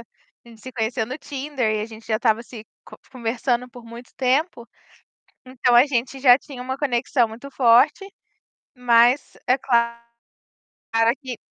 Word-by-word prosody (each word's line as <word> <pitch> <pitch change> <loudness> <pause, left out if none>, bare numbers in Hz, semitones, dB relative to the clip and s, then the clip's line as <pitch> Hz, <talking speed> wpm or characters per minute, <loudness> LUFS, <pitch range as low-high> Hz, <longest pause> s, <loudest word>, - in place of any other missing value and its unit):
a 235 +1 -23
gente 225 -2 -16
se 255 - -10
conheceu 225 -1 -2
no 260 +3 -6
Tinder 275 -5 -3
e 210 - -2
a 215 - -4
gente 225 0 -13
já 220 -1 -1
estava 225 0 +1
se 225 -2 -12 0.2
co - - -14 0.2
conversando 245 0 -2
por 240 0 -13
muito 235 +1 -12
tempo, 260 -1 -1 0.8
então 250 -1 +1
a 245 +4 +7
gente 265 -1 -2
já 255 -2 +6
tinha 270 -2 -11
uma 260 +1 -4
conexão 245 -3 0
muito 240 +5 -10
forte, 260 - +4 0.7
mas 245 +2 +3
é 255 - +3
claro 235 -3 0 1.2
que 255 -4 -7
245 Hz, 155 wpm, -22 LUFS, 230-260 Hz, 1.2 s, a